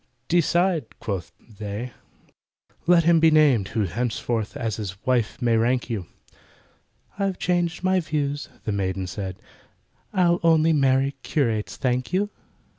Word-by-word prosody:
"Decide!" 175 -3 +1
quoth 95 -5 -4 0.3
they, 105 +4 -5 0.9
"let 175 -1 +6
him 165 0 +5
be 160 0 +6
named, 145 -10 +4
Who 110 +1 -1
henceforth 115 +4 -2
as 115 -6 -2
his 100 -3 -5
wife 125 -4 +1
may 120 -2 +2
rank 120 +2 +1
you." 100 -7 -3 1.1
"I've 195 -2 0
changed 175 -1 0
my 185 0 +3
views," 145 -3 -2
the 110 - -2
maiden 95 -1 -1
said, 95 +1 -5 0.8
"I 175 -3 +3
only 165 -1 +4
marry 135 -1 +3
curates, 115 -8 -1
thank 125 +1 -1
you!" 205 +3 +1
130 Hz, 130 wpm, -24 LUFS, 110-165 Hz, 1.1 s, let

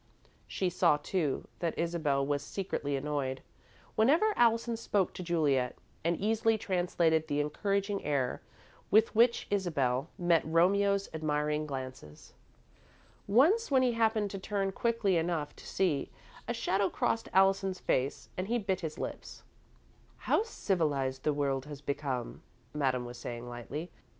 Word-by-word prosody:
She 185 -2 -1
saw, 170 -4 +4
too, 150 -1 -2
that 170 -2 -2
Isabel 160 -5 0
was 145 0 0
secretly 145 -7 -3
annoyed 135 -2 -2 0.5
whenever 320 - +4
Allison 230 0 +3
spoke 205 -4 0
to - - -7
Juliet, 150 -8 +1 0.3
and 170 +1 +1
easily 225 +2 +2
translated 175 -5 +1
the 145 -1 0
encouraging 200 +6 -1
air 135 -4 -1 0.5
with 220 +2 +4
which 235 +2 +4
Isabel 145 -8 0
met 175 -2 +3
Romeo's 200 +5 +3
admiring 150 -1 -1
glances. 130 - -8 0.9
Once, 315 - +4
when 265 -2 +4
he 250 - +3
happened 220 -3 +1
to 195 - -5
turn 195 0 -1
quickly 225 -3 +1
enough 160 -3 -1
to - - -12
see, 165 -8 0 0.4
a 235 - -1
shadow 195 -2 +1
crossed 225 - -1
Allison's 195 0 +3
face, 130 +2 -1
and 185 +1 -3
he 240 +2 +1
bit 195 -4 -1
his 160 -2 -5
lips. - - -6 0.7
"How - - +1
civilised 150 - -1
the 150 - +1
world 140 -2 -1
has 145 -2 -8
become," 140 -4 -3 0.3
Madame 130 -4 0
was 120 0 -8
saying, 120 0 -6
lightly. 130 +8 -6
170 Hz, 140 wpm, -31 LUFS, 145-200 Hz, 0.9 s, saw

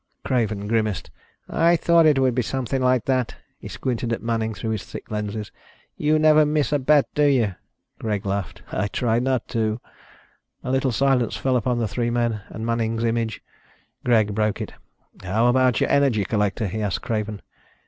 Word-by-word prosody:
Craven 110 -5 0
grimaced. 110 -3 -1 0.4
"I 170 +1 +3
thought 170 -1 +4
it 150 -3 +4
would 130 -2 +3
be 125 - +1
something 130 +2 -2
like 125 -2 +2
that." 130 -3 0 0.2
He - - -9
squinted 120 -2 -3
at 115 - -2
Manning 115 -1 -1
through 110 +4 -3
the 110 -3 -3
thick - - -10
lenses. 105 0 -4 0.4
"You 155 +1 +2
never 155 0 +6
miss 150 0 +1
a 145 - +2
bet, 145 +1 +4
do 150 - +3
you?" 125 -8 +3 0.5
Greg 105 -3 -2
laughed. 100 -4 -3
"I 105 - -1
try 115 +3 0
not 130 -1 0
to." 110 0 -1 0.8
A 130 - -3
little 130 0 +1
silence 130 0 +1
fell 130 -1 0
upon 125 0 +1
the 115 -2 0
three 115 +4 -1
men 120 -3 0
and 110 - -6
Manning's 115 0 -1
image. 115 -1 -1 0.6
Greg 110 -4 +3
broke 105 0 0
it. - - -5 0.5
"How 105 +5 +1
about 125 -1 +3
your - - +1
energy 130 -8 +3
collector?" 105 +1 0
he 105 +3 -3
asked 100 -3 -2
Craven. 105 -2 -3
115 Hz, 180 wpm, -23 LUFS, 110-130 Hz, 0.8 s, never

